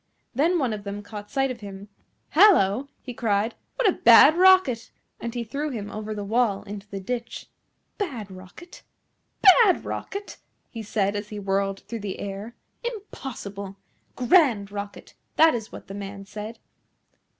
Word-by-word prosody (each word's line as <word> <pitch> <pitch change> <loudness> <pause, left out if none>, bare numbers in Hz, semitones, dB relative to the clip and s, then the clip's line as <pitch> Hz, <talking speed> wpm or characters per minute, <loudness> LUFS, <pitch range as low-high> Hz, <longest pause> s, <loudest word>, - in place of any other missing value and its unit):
Then 325 +8 +2
one 260 -8 0
of 210 -1 -6
them 200 0 -6
caught 205 0 -9
sight 270 -1 0
of 245 - -7
him. 200 -1 -9 0.4
"Hallo!" 280 - +5 0.2
he 250 - -7
cried, 220 -1 0 0.2
"what - - +2
a - - +6
bad 245 +6 +8
rocket!" 365 -10 +4 0.3
and 235 - -4
he 240 - -2
threw 280 +7 -3
him 210 -6 -5
over 215 0 -5
the 205 - -4
wall 215 -1 +1
into 205 0 -8
the 195 - -5
ditch. 235 +4 -5 0.5
"BAD 245 - -4
Rocket? 190 - -13 0.6
BAD 395 -1 +6
Rocket?" 400 +1 -6 0.3
he 230 - -6
said, 205 -1 -1
as 205 0 -4
he 210 - -7
whirled 195 0 -1
through 230 - -7
the 200 -2 -5
air; 200 +4 -6 0.3
"impossible! 230 - -7 0.4
GRAND 245 - +3
Rocket, 200 0 -7 0.2
that 320 +1 +6
is 225 -3 -5
what - - -10
the 195 - -8
man 200 0 -7
said. 215 +3 -8
220 Hz, 160 wpm, -25 LUFS, 200-270 Hz, 0.6 s, bad